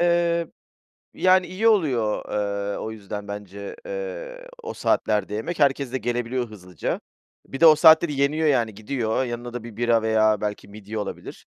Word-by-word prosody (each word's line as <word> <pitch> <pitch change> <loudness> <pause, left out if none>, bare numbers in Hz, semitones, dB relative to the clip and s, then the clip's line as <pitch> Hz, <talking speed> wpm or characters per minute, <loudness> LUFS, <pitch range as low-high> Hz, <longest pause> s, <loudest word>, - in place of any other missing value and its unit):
Eee, 170 -1 +2 0.7
yani, 185 0 +3
iyi 195 +5 0
oluyor, 135 - +2
eee, 100 -1 -2
o 110 - -5
yüzden 105 -1 -7
bence, 100 -1 -7
eee, - - -6 0.2
o 455 - -5
saatlerde 105 -1 0
yemek, 135 +11 -4
herkes 140 -3 +2
de - - +1
gelebiliyor 120 +1 -2
hızlıca. 90 -5 -5 0.5
Bir 135 - -7
de - - +6
o 155 -1 +9
saatte 160 +2 +7
de 150 - -4
yeniyor 145 +3 +1
yani, 120 -7 +2
gidiyor. 110 +2 -2
Yanına 120 0 -5
da 120 -2 -5
bir 115 -3 -10
bira 120 -1 +2
veya 110 -1 +2
belki 105 -1 -4
midye 105 +1 -8
olabilir. 105 - -6
120 Hz, 165 wpm, -24 LUFS, 105-160 Hz, 0.7 s, o